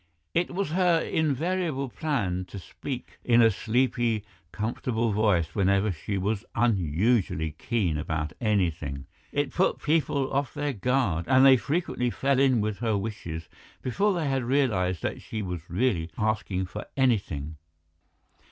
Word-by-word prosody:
It 170 - +1
was 195 -5 -1
her 175 -1 +3
invariable 160 -1 0
plan 110 - -2
to 100 - -9
speak 125 +7 -7
in 120 -1 +4
a 115 -1 +6
sleepy, 120 0 0 0.3
comfortable 115 +1 -1
voice 100 -7 +2
whenever 100 +1 +2
she 95 +4 -3
was 100 +3 -1
unusually 95 -4 +1
keen 85 -1 -1
about 80 -1 -2
anything; 85 - 0 0.3
it - - 0
put - - +2
people 145 -3 0
off 140 -2 -1
their 145 -1 -1
guard, 115 -7 0
and 130 +1 +6
they 135 -1 +9
frequently 140 -2 -1
fell 135 +2 +1
in 130 -4 +4
with 105 -1 -2
her 110 -3 +1
wishes 85 -6 -5 0.4
before 200 - +1
they 165 -4 -1
had 135 -2 0
realized 110 - +1
that - - -3
she 110 -1 -5
was 90 -3 -6
really 90 -3 0
asking 105 -3 0
for 90 - -7
anything. 85 - 0
110 Hz, 145 wpm, -27 LUFS, 90-135 Hz, 0.4 s, they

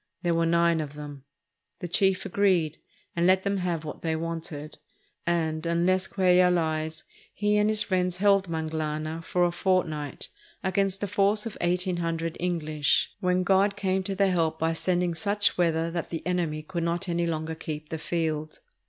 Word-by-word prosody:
There 170 -1 +2
were 165 0 +2
nine 170 -1 +3
of 145 -1 -7
them. 145 -2 -9 0.5
The 175 - -5
chief 190 +2 +2
agreed, 185 -5 +1 0.4
and 170 +1 +2
let 185 0 +4
them 200 0 0
have 175 -4 -2
what 150 - -7
they 160 -1 -1
wanted; 160 -2 -5 0.5
and, 160 -2 0
unless 175 +3 +1
Cuellar 180 -1 +4
lies, 160 -2 -1 0.3
he 210 0 +1
and 210 0 +3
his 215 -1 +3
friends 180 -3 0
held 195 -1 +3
"Manglana" 155 0 -3
for 180 +1 +1
a 175 - +3
fortnight 170 -6 -1 0.3
against 195 +1 0
a - - 0
force 205 +2 +2
of 225 - -5
eighteen 180 +1 0
hundred 165 -1 -2
Enghsh, 155 -4 +1
when 180 0 +1
God 195 +2 +3
came 190 -1 0
to 195 - -2
their 195 0 +3
help 165 -3 +1
by 165 +1 0
sending 175 +1 0
such 205 +5 +1
weather 165 -1 +1
that 170 -1 -3
the 165 - -5
enemy 170 -4 -1
could 170 +2 -4
not 170 +3 -1
any 170 0 0
longer 160 -1 -2
keep 155 -1 -6
the 160 - -4
field. 155 -2 -2
170 Hz, 175 wpm, -27 LUFS, 160-185 Hz, 0.5 s, let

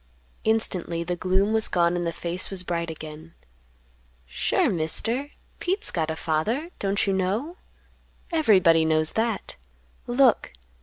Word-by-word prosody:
Instantly 185 -6 0
the 175 +1 -2
gloom 190 +4 +1
was 220 -1 +3
gone 170 -1 +2
and 175 -1 -1
the - - 0
face 170 +2 -2
was 190 -2 +1
bright 170 -1 -2
again. 155 +1 -9 0.9
"Sure, - - +1
Mister, 225 - -1 0.3
Pete's 390 +4 -1
got 160 -2 -1
a 160 - -2
father; 215 - -1
don't 200 +1 0
you 195 - +1
know? 210 - -1 0.7
Everybody 190 - +5
knows 155 0 +1
that. 225 -1 -2 0.5
Look!" 245 - +3
185 Hz, 135 wpm, -25 LUFS, 165-225 Hz, 0.9 s, Everybody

